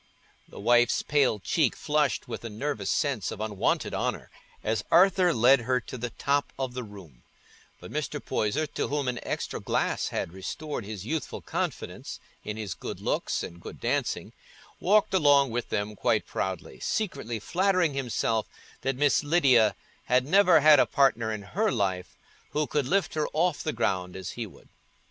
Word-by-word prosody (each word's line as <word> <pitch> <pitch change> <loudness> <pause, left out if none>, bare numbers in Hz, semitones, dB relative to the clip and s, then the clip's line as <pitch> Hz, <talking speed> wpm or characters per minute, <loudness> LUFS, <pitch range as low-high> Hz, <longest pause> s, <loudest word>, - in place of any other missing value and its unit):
The - - -11
wife's 120 +2 +3
pale 140 -6 +2
cheek 120 - +1
flushed 150 -2 0
with - - -6
a 115 - -5
nervous 110 -2 -3
sense 140 - 0
of 105 - -6
unwonted 105 -2 -1
honour - - -2 0.3
as 110 +1 0
Arthur 185 +1 +5
led 130 0 +5
her 125 +2 0
to 125 - -9
the 120 0 -4
top 140 +4 0
of 130 -2 -3
the 125 - -4
room; 95 - -12 0.6
but - - -11
Mr. - - -3
Poyser, 135 +9 -1
to - - -3
whom 145 -2 -1
an 125 -1 -1
extra - - -3
glass - - 0
had 85 - -3
restored 125 +6 -5
his 105 -2 -7
youthful 155 +4 -3
confidence - - -4 0.2
in 105 0 -5
his 105 -4 -4
good - - -7
looks - - -1
and 85 0 -8
good - - -9
dancing, - - -1 0.5
walked 205 +2 +3
along 145 -7 +5
with 120 +1 -3
them 105 +1 -2
quite - - +1
proudly, 95 -3 -4
secretly 140 - -2
flattering 180 - +1
himself 120 -4 -1 0.3
that 135 0 -1
Miss 145 +3 +3
Lydia 135 -9 +4 0.3
had 125 +1 +3
never 180 0 +5
had 150 -1 +8
a - - +4
partner 120 -5 +2
in 105 -2 -4
her 205 - 0
life 95 -2 -2 0.4
who 150 0 +1
could 145 -2 -1
lift 195 +6 +1
her 155 -1 0
off 160 -1 +1
the 155 - -1
ground 90 -8 -1
as 95 -1 -5
he 115 -2 -5
would. 95 - -18
130 Hz, 170 wpm, -27 LUFS, 110-150 Hz, 0.6 s, had